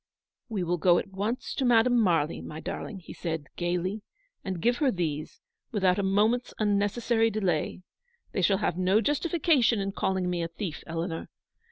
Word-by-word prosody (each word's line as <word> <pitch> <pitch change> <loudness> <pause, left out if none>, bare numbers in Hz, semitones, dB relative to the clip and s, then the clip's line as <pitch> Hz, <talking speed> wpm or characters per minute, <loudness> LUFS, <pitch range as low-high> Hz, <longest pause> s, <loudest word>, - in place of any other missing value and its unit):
"We 205 -5 -1
will 175 0 -1
go 175 +1 +5
at 195 - -3
once 210 +6 -2
to 275 - -1
Madame 245 0 +4
Marly, 165 -6 +1
my 155 - -7
darling," 195 +4 -5
he - - -10
said, 160 -4 -4
gaily, 180 +4 -1 0.2
" - - -45
and 185 -2 -3
give 240 +7 +2
her 285 0 +3
these, 160 - -3 0.3
without 190 -3 +2
a - - +3
moment's 210 +6 +1
unnecessary 220 +2 +2
delay. 185 -4 -1 0.5
They 190 - -1
shall 195 +2 +4
have 190 -3 -1
no 185 +3 +4
justification 295 - +2
in 195 0 -1
calling 190 -1 -1
me 175 -1 -1
a 165 - -1
thief, 170 -1 -6
Eleanor. 165 0 -4
195 Hz, 175 wpm, -28 LUFS, 175-225 Hz, 0.5 s, go